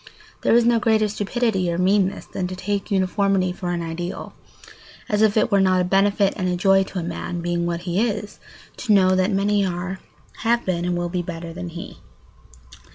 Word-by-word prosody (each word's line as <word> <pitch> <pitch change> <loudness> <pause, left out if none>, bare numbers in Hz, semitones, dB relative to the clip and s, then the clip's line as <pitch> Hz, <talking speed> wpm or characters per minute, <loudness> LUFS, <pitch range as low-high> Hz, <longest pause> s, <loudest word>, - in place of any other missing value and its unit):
There - - +3
is 240 -1 +5
no 235 -1 +4
greater 220 -2 +2
stupidity 205 -3 -1
or 170 - -2
meanness 190 +1 +1
than 180 - -4
to 185 - -6
take 200 +2 -3
uniformity 195 -1 +1
for 180 -1 -5
an 175 -1 -2
ideal, 165 +2 -5 0.7
as 210 0 0
if 220 -1 +3
it 215 - +2
were 200 -1 +4
not 185 -1 +3
a - - +2
benefit 195 +2 +2
and 185 -2 -1
a 180 - 0
joy 195 +1 +4
to 190 - -8
a 175 - -2
man, 175 +1 -4
being 175 0 -1
what 170 0 -2
he 180 +2 -1
is, 210 -2 -2 0.4
to 225 -4 +1
know 185 -2 +5
that 185 +1 +2
many 200 +1 +2
are, 185 +1 -3 0.4
have 235 0 +1
been, 175 -2 -1
and 180 0 0
will 175 0 -2
be 180 0 -2
better 170 -1 -7
than 180 0 -6
he. 170 +1 -9
185 Hz, 205 wpm, -22 LUFS, 175-205 Hz, 0.7 s, is